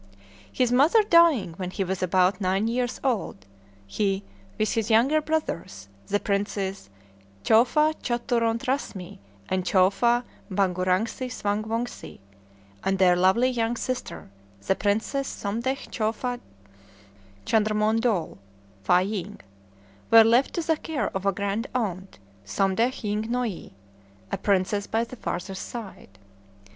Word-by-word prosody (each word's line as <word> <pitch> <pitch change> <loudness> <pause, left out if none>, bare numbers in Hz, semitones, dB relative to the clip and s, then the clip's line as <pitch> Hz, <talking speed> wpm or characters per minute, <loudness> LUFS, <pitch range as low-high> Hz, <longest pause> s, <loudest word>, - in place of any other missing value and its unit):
His 250 -2 +1
mother 305 - +5
dying 335 - +4
when 185 -2 -4
he 195 +1 -2
was 190 0 -3
about 185 +2 +2
nine 190 +3 +1
years 245 +1 -1
old, 215 - -2 0.4
he, 195 - -1 0.3
with 215 - 0
his 225 -1 -1
younger 260 +8 +4
brothers, 170 - -3 0.2
the 205 - +1
Princes 200 - -2 0.5
Chowfa 300 +8 +4
Chaturont 235 0 0
Rasmi 225 -9 -3 0.3
and 185 -1 -1
Chowfa 195 +7 +3 0.3
Bhangurangsi 190 +6 0
Swang 210 -2 -1
Wongse, 230 +2 -4 0.7
and 195 0 +1
their 185 -2 +5
lovely 190 +8 +3
young 235 -1 -1
sister, 255 - -5 0.3
the - - +3
Princess 220 +8 -1
Somdetch 235 +7 -3
Chowfa 240 +2 -2 1.1
Chandrmondol 215 - +1 0.4
("Fâ 180 - +3
ying"), 205 -1 -5 0.7
were 225 0 +9
left 235 +4 +3
to 340 - -1
the 320 -1 +2
care 290 -11 -3
of 190 +1 -3
a - - +4
grand 200 +4 -2
aunt, 190 -6 -3 0.3
Somdetch 195 - 0
Ying 210 +1 -2
Noie, 240 - -3 0.6
a - - -1
princess 200 +1 0
by 225 +1 0
the 235 +2 -8
father's 190 -3 -5
side. 195 - -9
215 Hz, 125 wpm, -25 LUFS, 190-245 Hz, 1.1 s, were